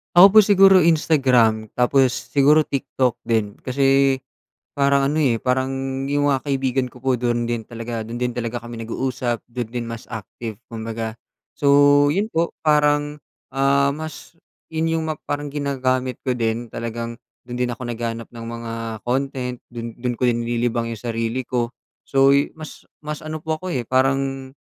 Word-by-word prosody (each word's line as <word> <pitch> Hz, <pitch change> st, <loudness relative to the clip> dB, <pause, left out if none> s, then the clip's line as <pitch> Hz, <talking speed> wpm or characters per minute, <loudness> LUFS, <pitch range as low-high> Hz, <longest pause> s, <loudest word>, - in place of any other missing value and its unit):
Ako 190 Hz, +2 st, +9 dB
po 215 Hz, -, +8 dB
siguro 195 Hz, -2 st, +7 dB
Instagram 130 Hz, -9 st, +3 dB
tapos 125 Hz, -1 st, +2 dB
siguro 150 Hz, +2 st, +5 dB
TikTok 130 Hz, -3 st, -1 dB
din, 110 Hz, -3 st, +1 dB
kasi 135 Hz, +1 st, +3 dB, 0.6 s
parang 140 Hz, 0 st, +3 dB
ano, 155 Hz, -, -1 dB
eh, 125 Hz, -7 st, +2 dB
parang 130 Hz, +1 st, 0 dB, 0.3 s
yung 145 Hz, +1 st, +1 dB
mga 135 Hz, +1 st, 0 dB
kaibigan 135 Hz, -2 st, 0 dB
ko 125 Hz, 0 st, -12 dB
po 130 Hz, -2 st, +1 dB
dun 120 Hz, -1 st, -1 dB
din 115 Hz, -2 st, -2 dB
talaga 115 Hz, -1 st, -5 dB
dun 120 Hz, +2 st, -6 dB
din 125 Hz, -, +1 dB
talaga 120 Hz, 0 st, -4 dB
kami 120 Hz, 0 st, -8 dB
nag-uusap, 120 Hz, +1 st, -2 dB
dun 120 Hz, 0 st, -3 dB
din 120 Hz, -1 st, -3 dB
mas 115 Hz, 0 st, -7 dB
active 110 Hz, 0 st, -7 dB
kumbaga 115 Hz, 0 st, -5 dB, 0.4 s
so, 145 Hz, -, -3 dB, 0.5 s
yun 205 Hz, +4 st, 0 dB
po 170 Hz, -2 st, 0 dB
parang, 150 Hz, -1 st, +2 dB, 0.3 s
ah, 140 Hz, +1 st, +2 dB
mas 155 Hz, +3 st, -7 dB, 0.3 s
yun 160 Hz, 0 st, 0 dB
yung -, -, -3 dB
ma 155 Hz, -, -3 dB
parang 145 Hz, 0 st, -3 dB
ginagamit 130 Hz, -3 st, -1 dB
ko 125 Hz, -2 st, -1 dB
din 115 Hz, 0 st, -1 dB
talagang 115 Hz, 0 st, -5 dB, 0.2 s
dun 120 Hz, 0 st, -7 dB
din 125 Hz, -1 st, 0 dB
ako 120 Hz, +1 st, -7 dB
naghahanap 115 Hz, -1 st, -4 dB
ng 115 Hz, -1 st, -9 dB
mga 115 Hz, -1 st, -6 dB, 0.3 s
content, 125 Hz, -1 st, -2 dB, 0.2 s
dun 115 Hz, 0 st, -6 dB
dun 125 Hz, 0 st, -2 dB
ko 125 Hz, +1 st, +1 dB
nililibang 120 Hz, 0 st, 0 dB
yung 110 Hz, -, -10 dB
sarili 115 Hz, +2 st, -1 dB
ko 120 Hz, -1 st, -2 dB, 0.3 s
so 135 Hz, 0 st, +4 dB
yu 140 Hz, +1 st, +3 dB
mas 155 Hz, -1 st, -11 dB, 0.2 s
mas 150 Hz, 0 st, -6 dB
ano 155 Hz, 0 st, -5 dB
po 160 Hz, -1 st, -2 dB
ako, 185 Hz, +1 st, -5 dB
eh, 125 Hz, -, 0 dB
parang, 135 Hz, +1 st, 0 dB
130 Hz, 165 wpm, -22 LUFS, 120-140 Hz, 0.6 s, Ako